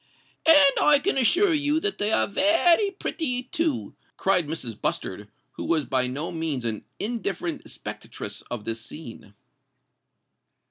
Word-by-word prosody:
"And 290 -4 +8
I 295 -1 +6
can 345 +6 0
assure 345 - +3
you 295 0 +2
that 410 +2 -2
they 205 +1 +1
are - - +3
very 335 - +3
pretty 310 -9 -3
too," 305 +1 -2 0.2
cried 185 -5 +2
Mrs. 130 -9 -6
Bustard, - - -3 0.3
who - - -4
was 160 -3 +1
by 130 -1 0
no 140 +6 -4
means 160 -7 -3
an 110 -2 -3
indifferent 200 -7 -3
spectatress - - -6
of 115 -4 -5
this 115 0 -3
scene. 110 -4 -10
210 Hz, 140 wpm, -25 LUFS, -, 0.3 s, And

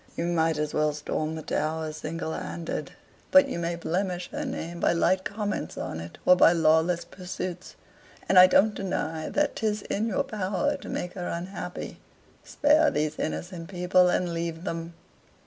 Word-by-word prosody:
You 170 - -1
might 165 -2 +1
as 150 0 -2
well 150 0 +2
storm 155 +1 -3
the 160 - -6
Tower 155 +1 -2
single 160 +1 -4
handed. 170 -1 -5 0.4
But 280 0 +7
you 215 - -3
may 170 0 -1
blemish 180 +1 -2
her - - -3
name 170 +1 -5
by - - +3
light 185 +2 +2
comments 205 0 -3
on 80 - -4
it, 85 +1 -9
or 180 - +8
by 175 -1 +6
lawless 165 +1 +3
pursuits 185 -1 -6 0.5
and 185 - +7
I 185 - +10
don't 210 +3 +4
deny 160 -5 -3
that 295 -1 0
'tis 210 -2 -1
in 215 +3 -1
your 255 +5 0
power 215 +3 -1
to 275 - -10
make 180 - -3
her 180 -2 -5
unhappy. 180 +1 -5 0.4
Spare 300 +1 +3
these 150 0 -2
innocent 170 +1 -4
people, 180 -1 +3
and 180 -1 0
leave 165 0 -3
them." 165 -2 -5
175 Hz, 170 wpm, -27 LUFS, 160-190 Hz, 0.5 s, I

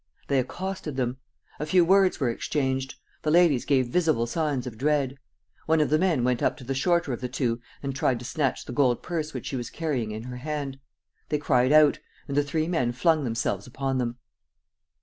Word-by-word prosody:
They 140 - +3
accosted 180 +2 -4
them. 125 0 -1 0.4
A 150 - -2
few 175 +2 +4
words 190 +1 +4
were 130 -5 +1
exchanged. 130 +1 -2 0.3
The 155 - -1
ladies 160 -6 +4
gave 130 -3 +3
visible 155 -6 +2
signs 145 -1 -1
of 125 -3 -6
dread. 140 -1 +1 0.5
One 160 0 +3
of 150 -3 +1
the 155 - +4
men 170 -9 +2
went 125 -1 +1
up - - +1
to - - -11
the 135 +2 -2
shorter 155 +1 +1
of 120 - -5
the 125 - -3
two 120 -2 -1 0.2
and 135 -1 -3
tried 130 -2 +1
to 120 - -9
snatch 140 0 -1
the - - -6
gold 125 -3 +2
purse 160 -3 -3
which 130 - -6
she - - -3
was 120 - -4
carrying 145 -9 -2
in 110 +1 -5
her 125 0 -7
hand. 140 0 -4 0.5
They 150 - +1
cried 130 -3 +2
out; 155 -1 +6 0.3
and 140 - -3
the 145 - +4
three 155 +2 -1
men 125 -9 0
flung 160 +3 +2
themselves 115 -4 -2
upon 135 +1 -2
them. 120 -1 -2
135 Hz, 210 wpm, -26 LUFS, 125-155 Hz, 0.5 s, out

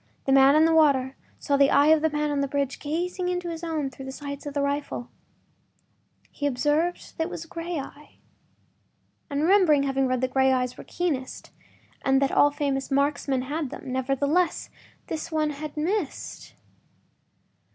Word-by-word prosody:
The 270 - +1
man 270 +1 +6
in 310 +1 +6
the 325 - +3
water 275 -4 +3 0.2
saw 280 - 0
the 275 0 +5
eye 285 +2 +5
of 315 -1 +5
the 320 - +2
man 300 0 -1
on 285 -1 0
the 280 - 0
bridge 280 -1 -2
gazing 355 +4 -2
into 355 -1 -2
his 330 0 -7
own 310 -5 -2
through 265 +1 -10
the 265 - -6
sights 280 +1 -7
of 290 - -6
the 285 - +1
rifle. 280 -4 -3 1.2
He 290 - -2
observed 295 +6 -1
that 320 - +1
it - - -5
was 330 - -6
a - - -20
gray 335 0 -5
eye 285 +2 -9 1.1
and 285 0 -1
remembered 330 -6 +4
having 270 -1 +1
read 255 -1 0
that 255 0 -1
gray 265 0 +4
eyes 250 -1 0
were - - -10
keenest, 295 -8 -3 0.5
and 270 0 +3
that 275 0 +1
all 290 - +5
famous 280 -2 -2
marksmen 275 -1 0
had 290 +1 -3
them. 270 0 -8
Nevertheless, 280 +7 0 0.3
this 315 +1 -5
one 310 -1 0
had 295 +1 -7
missed. 340 0 -3
285 Hz, 180 wpm, -25 LUFS, 270-315 Hz, 1.2 s, man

